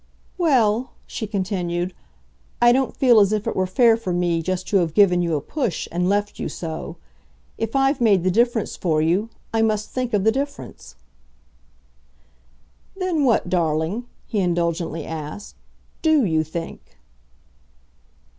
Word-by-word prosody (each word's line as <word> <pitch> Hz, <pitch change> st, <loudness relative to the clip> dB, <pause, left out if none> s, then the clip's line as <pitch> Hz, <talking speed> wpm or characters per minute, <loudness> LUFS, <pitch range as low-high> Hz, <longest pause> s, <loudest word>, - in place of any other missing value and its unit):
"Well," 255 Hz, -, +2 dB
she 220 Hz, -, -5 dB
continued, 185 Hz, -3 st, -2 dB, 0.7 s
"I 240 Hz, 0 st, +6 dB
don't 260 Hz, +1 st, 0 dB
feel 245 Hz, -4 st, +6 dB
as 200 Hz, -1 st, +4 dB
if 215 Hz, -1 st, -1 dB
it -, -, -2 dB
were 185 Hz, 0 st, 0 dB
fair 230 Hz, +4 st, +4 dB
for 225 Hz, -5 st, -4 dB
me 175 Hz, -1 st, 0 dB
just 185 Hz, +2 st, -3 dB
to 200 Hz, -, +3 dB
have 170 Hz, -4 st, 0 dB
given 180 Hz, -4 st, +5 dB
you 170 Hz, -2 st, 0 dB
a 145 Hz, -, -1 dB
push 235 Hz, -, -3 dB
and 180 Hz, +2 st, 0 dB
left 205 Hz, +1 st, -1 dB
you -, -, -3 dB
so. 160 Hz, -2 st, -6 dB, 0.6 s
If 225 Hz, +3 st, -3 dB
I've 270 Hz, 0 st, +2 dB
made 200 Hz, -6 st, +4 dB
the 185 Hz, -, +2 dB
difference 235 Hz, +1 st, +1 dB
for 160 Hz, -4 st, 0 dB
you, 175 Hz, +8 st, +1 dB, 0.2 s
I 225 Hz, -, +2 dB
must 215 Hz, -1 st, 0 dB
think 250 Hz, -3 st, -1 dB
of 200 Hz, -, +1 dB
the 220 Hz, -, +4 dB
difference." 280 Hz, +3 st, -6 dB, 2.0 s
"Then 360 Hz, -6 st, 0 dB
what, 230 Hz, -7 st, +2 dB
darling," 170 Hz, +6 st, -1 dB, 0.2 s
he 215 Hz, -, -2 dB
indulgently 170 Hz, -3 st, -1 dB
asked, 160 Hz, +5 st, -7 dB, 0.5 s
"DO 315 Hz, -6 st, +3 dB
you 160 Hz, -3 st, +1 dB
think?" 165 Hz, +2 st, -6 dB
200 Hz, 150 wpm, -22 LUFS, 175-235 Hz, 2.0 s, I